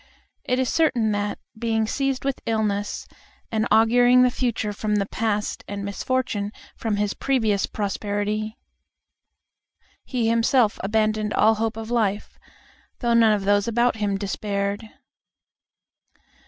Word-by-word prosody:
It 250 - +1
is 260 -1 +1
certain 240 -8 +2
that, 205 0 -2 0.2
being 225 -1 0
seized 270 +3 -1
with 275 -1 -1
illness, 210 -2 -1 0.4
and 220 0 0
auguring 245 +3 +5
the 250 - +3
future 230 -4 -1
from 210 +1 -1
the 200 -1 +1
past 210 0 -2
and 200 0 -5
misfortune 210 -1 -2 0.2
from 220 -2 -2
his 205 0 0
previous 220 -7 +1
prosperity, 210 +1 -2 1.5
he 245 -4 -1
himself 230 0 +3
abandoned 215 +1 0
all 220 +1 +5
hope 225 0 -2
of 225 +1 -6
life, 210 -4 -1 0.6
though 240 -2 0
none 225 -2 +5
of 200 -2 -1
those 205 +1 +3
about 235 0 +2
him 205 -2 0
despaired. 200 +1 -3
220 Hz, 125 wpm, -24 LUFS, 205-235 Hz, 1.5 s, auguring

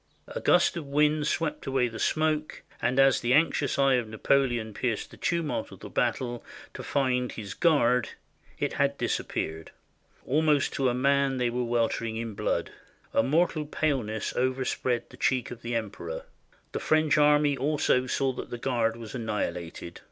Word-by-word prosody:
A - - -5
gust - - +4
of 160 -4 -5
wind 150 +1 +2
swept 160 -2 -2
away 130 -2 +2
the 115 -1 -7
smoke, 155 -1 0 0.2
and 125 +2 0
as 135 -1 +5
the 125 +1 +3
anxious 150 -3 +2
eye 135 -1 +4
of 120 -3 -2
Napoleon 120 -1 +1
pierced 115 -1 -2
the - - -12
tumult 170 -3 -1
of - - -13
the - - -9
battle 120 -2 -1 0.3
to - - -7
find 125 -3 0
his 100 -4 -6
Guard, 125 -7 +3 0.5
it - - -1
had - - +1
disappeared. 80 0 -3 0.6
Almost 150 0 +2
to 135 -2 +1
a 120 - -1
man 140 +1 +2
they 125 -1 0
were 125 +1 -1
weltering 115 -1 0
in 115 -1 -4
blood. - - -1 0.4
A - - +4
mortal 155 +2 +1
paleness 125 -9 -1
overspread 130 -1 -1
the - - -13
cheek 130 -3 0
of 120 -1 -8
the 120 0 -3
Emperor. 100 -7 -4 0.5
The - - -3
French 155 -1 +3
army 150 -1 +4
also 135 -2 +1
saw 135 0 0
that - - -7
the 120 - -5
Guard 115 -2 0
was 115 -2 -9
annihilated. 95 -7 -4
130 Hz, 165 wpm, -28 LUFS, 115-145 Hz, 0.6 s, as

